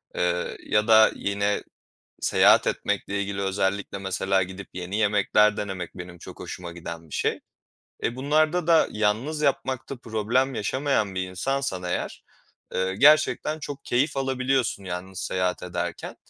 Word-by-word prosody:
eee, 90 Hz, 0 st, -1 dB
ya 105 Hz, +1 st, +2 dB
da 110 Hz, -1 st, +7 dB
yine 100 Hz, +1 st, -1 dB, 0.6 s
seyahat -, -, +5 dB
etmekle 100 Hz, 0 st, -1 dB
ilgili 100 Hz, 0 st, -4 dB
özellikle 95 Hz, 0 st, -1 dB
mesela 95 Hz, 0 st, 0 dB
gidip 95 Hz, +1 st, -7 dB
yeni 90 Hz, +2 st, -4 dB
yemekler 105 Hz, 0 st, +3 dB
denemek 95 Hz, -4 st, -5 dB
benim 90 Hz, -1 st, -8 dB
çok -, -, -11 dB
hoşuma 85 Hz, -2 st, -7 dB
giden 85 Hz, -1 st, -8 dB
bir -, -, -9 dB
şey. -, -, 0 dB, 0.6 s
E, 120 Hz, -, -1 dB
bunlarda 155 Hz, +5 st, +2 dB
da 165 Hz, -2 st, +5 dB
yalnız 110 Hz, +9 st, 0 dB
yapmakta 135 Hz, -1 st, -1 dB
problem 120 Hz, +4 st, 0 dB
yaşamayan 110 Hz, -4 st, 0 dB
bir 95 Hz, 0 st, -2 dB
insansan 95 Hz, 0 st, -2 dB
eğer, 90 Hz, -, -3 dB, 0.5 s
eee, 95 Hz, 0 st, 0 dB
gerçekten 155 Hz, +2 st, +4 dB
çok 145 Hz, -2 st, -7 dB
keyif 135 Hz, +4 st, +1 dB
alabiliyorsun 130 Hz, -5 st, 0 dB
yalnız 90 Hz, +1 st, -5 dB
seyahat 90 Hz, -1 st, -1 dB
ederken. 90 Hz, -1 st, -4 dB
105 Hz, 135 wpm, -25 LUFS, 95-130 Hz, 0.6 s, da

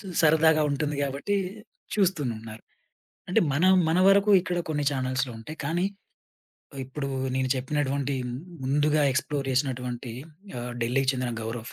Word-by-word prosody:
చు 200 Hz, -, -11 dB, 0.2 s
సరదాగా 160 Hz, 0 st, +5 dB
ఉంటుంది 150 Hz, +1 st, -1 dB
గాబట్టీ, 140 Hz, +9 st, -1 dB, 0.6 s
చూస్తునున్నారు. 120 Hz, -, -1 dB, 0.7 s
అంటే 180 Hz, -, +4 dB
మనం 185 Hz, +6 st, +5 dB, 0.2 s
మన 170 Hz, +3 st, +3 dB
వరకు 200 Hz, +1 st, +5 dB
ఇక్కడ 175 Hz, -1 st, -2 dB
కొన్ని 150 Hz, -2 st, 0 dB
ఛానల్స్‌లో 130 Hz, -1 st, -1 dB
ఉంటాయి. 155 Hz, +8 st, -9 dB
కానీ 175 Hz, +5 st, 0 dB, 0.9 s
ఆహ్, 135 Hz, -, -5 dB
ఇప్పుడూ 140 Hz, +1 st, -5 dB, 0.3 s
నేను 130 Hz, 0 st, 0 dB
చెప్పినటువంటీ 140 Hz, +1 st, -1 dB, 0.5 s
ముందుగా 150 Hz, +3 st, +2 dB
ఎక్స్‌ప్లోర్ 140 Hz, 0 st, -1 dB
జేషినటువంటీ 125 Hz, -2 st, -2 dB, 0.4 s
ఆహ్, 120 Hz, 0 st, -5 dB
ఢిల్లీకి 130 Hz, +3 st, +2 dB
చెందిన 125 Hz, -2 st, -2 dB
గౌరవ్, 115 Hz, +1 st, -5 dB
140 Hz, 130 wpm, -26 LUFS, 130-155 Hz, 0.9 s, సరదాగా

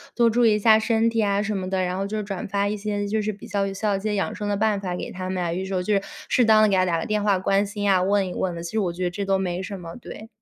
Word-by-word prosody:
多 235 Hz, -1 st, +4 dB
注 230 Hz, +1 st, +3 dB
意 215 Hz, -, +4 dB
一 -, -, +1 dB
下 220 Hz, +1 st, +6 dB
身 225 Hz, 0 st, +2 dB
体 225 Hz, -, +1 dB
啊” 200 Hz, -1 st, +1 dB
什 215 Hz, -1 st, -2 dB
么 185 Hz, -1 st, -3 dB
的， 190 Hz, -1 st, 0 dB
然 180 Hz, 0 st, -2 dB
后 195 Hz, +1 st, -2 dB
就 215 Hz, +2 st, -3 dB
是 215 Hz, -, -2 dB
转 195 Hz, -2 st, -5 dB
发 200 Hz, +1 st, 0 dB
一 210 Hz, -, -1 dB
些 205 Hz, 0 st, -3 dB
就 215 Hz, +1 st, 0 dB
是 215 Hz, +1 st, -1 dB
比 200 Hz, -, -11 dB
较 200 Hz, -1 st, -1 dB
有 195 Hz, -, -4 dB
效 205 Hz, +1 st, 0 dB
一 195 Hz, -, -2 dB
些 210 Hz, +1 st, -2 dB
养 195 Hz, -, -1 dB
生 205 Hz, -1 st, -4 dB
的 205 Hz, -, 0 dB
办 210 Hz, -1 st, +1 dB
法 180 Hz, -2 st, -3 dB
给 -, -, -5 dB
他 185 Hz, 0 st, -5 dB
们 185 Hz, -1 st, -2 dB
啊， 170 Hz, -1 st, -1 dB
有 185 Hz, +2 st, -3 dB
时 190 Hz, 0 st, -4 dB
候 180 Hz, -, 0 dB
就 210 Hz, -, 0 dB
是 200 Hz, -, +2 dB, 0.3 s
适 250 Hz, -, +3 dB
当 220 Hz, -1 st, +5 dB
地 215 Hz, -, +4 dB
给 195 Hz, -, +2 dB
他 185 Hz, 0 st, +3 dB
打 170 Hz, -2 st, 0 dB
个 -, -, -4 dB
电 210 Hz, -1 st, -1 dB
话 200 Hz, -2 st, +3 dB
关 195 Hz, +2 st, +2 dB
心 205 Hz, 0 st, -3 dB
啊， 190 Hz, -2 st, +4 dB
问 195 Hz, +1 st, +2 dB
一 180 Hz, -, -5 dB
问 180 Hz, -2 st, -2 dB
的， 170 Hz, -, -6 dB
其 170 Hz, -, -6 dB
实 220 Hz, -, 0 dB
我 185 Hz, -4 st, 0 dB
觉 180 Hz, +2 st, -5 dB
得 175 Hz, -, 0 dB
这 200 Hz, +2 st, -4 dB
都 195 Hz, 0 st, +1 dB
没 180 Hz, -1 st, -2 dB
什 195 Hz, 0 st, -6 dB
么， 170 Hz, -1 st, -9 dB
对。 225 Hz, -2 st, -10 dB
200 Hz, 390 characters per minute, -24 LUFS, 185-210 Hz, 0.3 s, 下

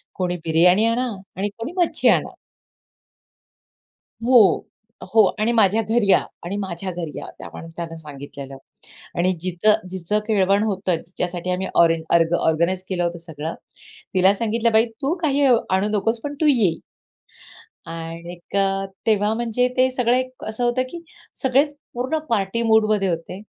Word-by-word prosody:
कोणी 180 Hz, -1 st, -1 dB
बिर्याणी 180 Hz, +6 st, +4 dB
आणा 245 Hz, +2 st, +1 dB, 0.3 s
आणि 205 Hz, +2 st, -1 dB
कोणी 235 Hz, +8 st, -5 dB
मच्छी 350 Hz, -2 st, +1 dB
आणा. -, -, +3 dB, 1.9 s
हो, 235 Hz, -4 st, +5 dB, 0.4 s
हो 220 Hz, -1 st, +7 dB, 0.2 s
आणि 230 Hz, +2 st, +2 dB
"माझ्या 220 Hz, 0 st, +3 dB
घरी 220 Hz, -2 st, +1 dB
या -, -, +7 dB, 0.3 s
आणि 195 Hz, +4 st, -3 dB
माझ्या 190 Hz, -1 st, -4 dB
घरी 165 Hz, -3 st, -5 dB
या." -, -, -7 dB
त्या -, -, -8 dB
माणसाने 165 Hz, 0 st, -7 dB
सांगितलेलं 140 Hz, -2 st, -9 dB, 0.6 s
आणि 185 Hz, +2 st, +2 dB
जिचं 185 Hz, +4 st, +2 dB, 0.2 s
जिचं 190 Hz, +3 st, -1 dB
केळवण 200 Hz, -1 st, +3 dB
होतं, 190 Hz, -4 st, 0 dB
जिच्यासाठी 180 Hz, +1 st, -4 dB
आम्ही 185 Hz, +1 st, -1 dB
ऑरेज 165 Hz, -1 st, +4 dB
अर्ग 170 Hz, 0 st, +3 dB
ऑर्गनाइज 170 Hz, +4 st, +1 dB
केलं 175 Hz, -2 st, -1 dB
होतं 170 Hz, 0 st, -2 dB
सगळं, 160 Hz, 0 st, -5 dB, 0.6 s
तिला 190 Hz, +2 st, +5 dB
सांगितलं, 230 Hz, +2 st, 0 dB
"बाई 220 Hz, +1 st, +5 dB, 0.2 s
तू 285 Hz, +5 st, +1 dB
काही 285 Hz, -2 st, +2 dB
अ, 250 Hz, -, +6 dB, 0.2 s
आणू 190 Hz, +3 st, +2 dB
नकोस 225 Hz, +3 st, -1 dB
पण 290 Hz, 0 st, -3 dB
तू 310 Hz, -, +3 dB
ये." 195 Hz, -9 st, +2 dB, 1.2 s
आणिक, 170 Hz, +3 st, -7 dB, 0.5 s
तेव्हा 210 Hz, -1 st, +2 dB
म्हणजे 240 Hz, +1 st, 0 dB
ते 260 Hz, 0 st, +4 dB
सगळं 250 Hz, -1 st, +2 dB
एक 255 Hz, 0 st, -4 dB
असं 220 Hz, +3 st, -3 dB
होतं 240 Hz, +1 st, +2 dB
की 340 Hz, -1 st, -8 dB, 0.4 s
सगळेच 275 Hz, +3 st, +2 dB, 0.2 s
पूर्ण 260 Hz, +6 st, -1 dB
पार्टी 220 Hz, +1 st, 0 dB
मूडमध्ये 215 Hz, -3 st, +3 dB
होते 175 Hz, +2 st, -4 dB
200 Hz, 150 wpm, -22 LUFS, 175-230 Hz, 1.9 s, हो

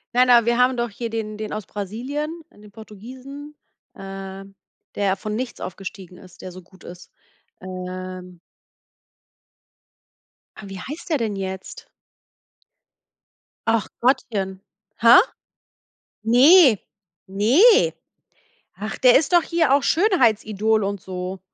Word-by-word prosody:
Nein, 250 Hz, +1 st, +4 dB
aber, 240 Hz, -2 st, +6 dB
wir 235 Hz, +1 st, +1 dB
haben 250 Hz, 0 st, +3 dB
doch 235 Hz, -2 st, -2 dB
hier 230 Hz, +3 st, -5 dB
den 220 Hz, -1 st, -5 dB
den 215 Hz, -, -5 dB
aus 210 Hz, -2 st, -5 dB
Brasilien, 275 Hz, -, -5 dB
den 210 Hz, 0 st, -17 dB
Portugiesen, 255 Hz, +8 st, -11 dB, 0.4 s
ähm, 195 Hz, 0 st, -9 dB, 0.4 s
der 195 Hz, -2 st, 0 dB
von 210 Hz, +2 st, -5 dB
nichts 250 Hz, +2 st, -5 dB
aufgestiegen 185 Hz, -1 st, -8 dB
ist, 185 Hz, 0 st, -16 dB
der 185 Hz, -, -7 dB
so 185 Hz, +1 st, -11 dB
gut 185 Hz, +1 st, -21 dB
ist. 180 Hz, +1 st, -12 dB, 0.5 s
Ähm 185 Hz, -1 st, -8 dB, 2.2 s
Ah, -, -, -11 dB
wie 195 Hz, -1 st, -8 dB
heißt 295 Hz, -, -8 dB
der 310 Hz, -, +1 dB
denn 220 Hz, -4 st, -3 dB
jetzt? 190 Hz, -1 st, -7 dB, 1.8 s
Ach 225 Hz, -3 st, +1 dB
Gottchen. 200 Hz, -7 st, 0 dB, 0.4 s
Ha? 235 Hz, +1 st, +8 dB, 1.0 s
Ne, 255 Hz, -, +6 dB, 0.5 s
ne. 315 Hz, -, +4 dB, 0.9 s
Ach, 210 Hz, +2 st, -5 dB
der 250 Hz, -1 st, +6 dB
ist 300 Hz, +4 st, -3 dB
doch 345 Hz, -1 st, +5 dB
hier 330 Hz, -6 st, +1 dB
auch 285 Hz, -, +2 dB
Schönheitsidol 220 Hz, -, +1 dB
und 200 Hz, 0 st, -3 dB
so. 185 Hz, +1 st, -6 dB
215 Hz, 120 wpm, -22 LUFS, 190-255 Hz, 2.2 s, Ha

